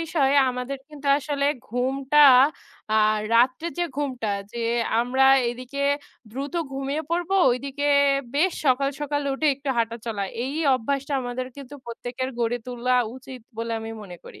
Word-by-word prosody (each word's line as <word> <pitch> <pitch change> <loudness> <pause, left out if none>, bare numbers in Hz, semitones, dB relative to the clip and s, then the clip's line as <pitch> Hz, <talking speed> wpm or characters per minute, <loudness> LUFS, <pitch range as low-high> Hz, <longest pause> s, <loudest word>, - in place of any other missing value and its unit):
বিষয় 300 -4 +1 0.2
আমাদের 250 +2 -4
কিন্তু 295 -2 -10
আসলে 285 -1 -1 0.2
ঘুমটা 270 +4 +3 0.7
আর 215 0 +3 0.2
রাত্রে 255 +6 +3
যে 350 - +2
ঘুমটা 255 -7 -2 0.2
যে 235 - -5 0.4
আমরা 255 +3 +2 0.3
এদিকে 255 +3 -6 0.5
দ্রুত 275 +6 -5 0.2
ঘুমিয়ে 275 +3 -3
পড়বো, 350 +2 0 0.2
ওইদিকে 275 +3 -2 0.5
বেশ 340 +6 +2
সকাল, 270 +1 +3
সকাল 290 0 -1
উঠে 310 +3 -1
একটু 280 +1 -8
হাঁটা 230 0 0
চলা। 215 -3 -2 0.2
এই 270 - -4 0.2
অভ্যাসটা 275 +4 -2
আমাদের 245 +1 -4
কিন্তু 280 0 -10
প্রত্যেকের 245 +2 -5
গড়ে 235 0 0
তোলা 250 0 -1 0.2
উচিত 260 -1 -10 0.2
বলে 230 0 -3
আমি 225 0 -6
মনে 180 -3 -10
করি। - - -12
260 Hz, 145 wpm, -24 LUFS, 245-280 Hz, 0.7 s, ঘুমটা